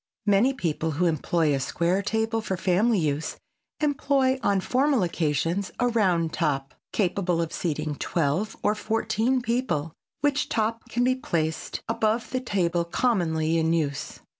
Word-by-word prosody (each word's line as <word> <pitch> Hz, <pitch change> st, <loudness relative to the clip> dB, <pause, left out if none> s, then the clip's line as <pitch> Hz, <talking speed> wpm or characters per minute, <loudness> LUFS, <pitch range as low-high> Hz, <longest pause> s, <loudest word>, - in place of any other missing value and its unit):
Many 205 Hz, +5 st, +4 dB
people 160 Hz, -, -1 dB
who 180 Hz, -, +2 dB
employ 160 Hz, -1 st, +1 dB
a 135 Hz, -, +1 dB
square 170 Hz, +7 st, 0 dB
table 220 Hz, +2 st, 0 dB
for 190 Hz, -3 st, -3 dB
family 200 Hz, +6 st, +2 dB
use, 155 Hz, -2 st, -1 dB, 0.4 s
employ 275 Hz, -3 st, +2 dB
on 200 Hz, -5 st, +2 dB
formal 260 Hz, +3 st, +2 dB
occasions 170 Hz, +3 st, -1 dB
a 245 Hz, -, +3 dB
round 180 Hz, -8 st, +1 dB
top, 135 Hz, -1 st, -1 dB, 0.2 s
capable 180 Hz, -3 st, 0 dB
of 165 Hz, -1 st, -2 dB
seating 155 Hz, -3 st, -2 dB
twelve 170 Hz, +6 st, -1 dB
or 210 Hz, -, +3 dB
fourteen 225 Hz, +3 st, 0 dB
people, 230 Hz, -, -1 dB, 0.3 s
which 290 Hz, 0 st, +1 dB
top 225 Hz, +1 st, -1 dB
can 240 Hz, -, 0 dB
be 255 Hz, +1 st, +3 dB
placed 160 Hz, -11 st, -2 dB
above 225 Hz, +1 st, 0 dB
the 255 Hz, 0 st, -1 dB
table 175 Hz, -7 st, 0 dB
commonly 165 Hz, -5 st, +1 dB
in 160 Hz, 0 st, +1 dB
use. 145 Hz, -3 st, -2 dB
185 Hz, 145 wpm, -26 LUFS, 160-230 Hz, 0.4 s, Many